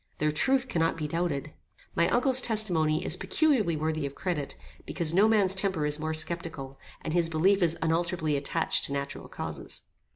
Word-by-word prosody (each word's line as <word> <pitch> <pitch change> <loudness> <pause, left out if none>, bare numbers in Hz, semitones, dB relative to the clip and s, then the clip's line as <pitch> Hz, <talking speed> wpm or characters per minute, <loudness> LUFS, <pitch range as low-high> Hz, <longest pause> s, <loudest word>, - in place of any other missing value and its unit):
Their 150 0 +1
truth 260 - +1
cannot 165 -6 0
be 155 -2 -3
doubted. 155 -2 -2 0.4
My 170 - +3
uncle's 255 +1 +4
testimony 175 -10 +1
is - - +2
peculiarly 225 - +1
worthy 155 -1 -1
of 140 - -10
credit, 165 -7 -3 0.3
because 165 -3 0
no 200 +4 +5
man's 205 -4 +3
temper 190 -5 0
is 150 +1 -1
more 160 0 -2
sceptical, 160 -4 -3 0.2
and 155 - -3
his 170 -1 +2
belief 190 +5 +2
is 165 -1 +3
unalterably 165 -1 0
attached 140 0 +1
to 140 - -3
natural 140 0 -5
causes. - - -6
165 Hz, 170 wpm, -28 LUFS, 155-190 Hz, 0.4 s, no